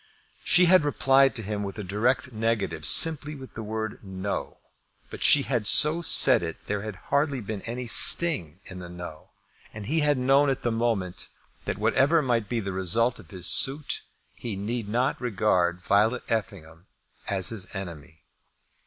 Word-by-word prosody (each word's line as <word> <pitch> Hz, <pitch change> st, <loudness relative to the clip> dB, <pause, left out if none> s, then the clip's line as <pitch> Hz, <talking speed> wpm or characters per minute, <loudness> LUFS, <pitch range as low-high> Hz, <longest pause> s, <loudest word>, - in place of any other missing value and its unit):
She 180 Hz, 0 st, +3 dB
had 185 Hz, -2 st, +4 dB
replied 135 Hz, -1 st, +1 dB
to 115 Hz, -, -4 dB
him 105 Hz, +1 st, -5 dB
with 100 Hz, 0 st, -7 dB
a 105 Hz, -, -6 dB
direct 120 Hz, +7 st, -2 dB
negative, 105 Hz, -9 st, -2 dB
simply 155 Hz, -, +4 dB
with 135 Hz, -2 st, -13 dB
the 110 Hz, -, -8 dB
word 110 Hz, 0 st, -6 dB
"no;" 95 Hz, +1 st, -6 dB, 0.5 s
but -, -, -10 dB
she 145 Hz, -, +4 dB
had 120 Hz, -6 st, -3 dB
so 155 Hz, +8 st, +3 dB
said 170 Hz, -, +4 dB
it 80 Hz, -2 st, -6 dB
that -, -, -33 dB
there 105 Hz, -1 st, -4 dB
had 105 Hz, -1 st, -8 dB, 0.2 s
hardly 140 Hz, -1 st, 0 dB
been 105 Hz, -2 st, -7 dB
any 125 Hz, +2 st, -6 dB
sting 115 Hz, -, +7 dB
in 95 Hz, -2 st, -10 dB
the 90 Hz, -1 st, -10 dB
no; 85 Hz, -3 st, -11 dB, 0.4 s
and 105 Hz, -1 st, -10 dB
he 160 Hz, +7 st, -2 dB
had 150 Hz, -2 st, 0 dB
known 135 Hz, +3 st, +2 dB
at 135 Hz, -, -4 dB
the 120 Hz, -, -1 dB
moment 115 Hz, -6 st, -3 dB, 0.4 s
that -, -, -4 dB
whatever 155 Hz, +4 st, +1 dB
might 115 Hz, -5 st, -2 dB
be 120 Hz, -, -3 dB
the 100 Hz, -3 st, -6 dB
result 110 Hz, +6 st, -1 dB
of -, -, -17 dB
his 95 Hz, -4 st, -9 dB
suit, 140 Hz, +2 st, +1 dB, 0.3 s
he 115 Hz, -4 st, -7 dB
need 105 Hz, +2 st, -5 dB
not 130 Hz, +7 st, -2 dB
regard 90 Hz, -6 st, -1 dB
Violet 105 Hz, +7 st, 0 dB
Effingham 85 Hz, -6 st, -6 dB, 0.4 s
as 95 Hz, -3 st, -3 dB
his 100 Hz, -5 st, -6 dB
enemy. 80 Hz, -4 st, -10 dB
110 Hz, 175 wpm, -24 LUFS, 95-135 Hz, 0.5 s, sting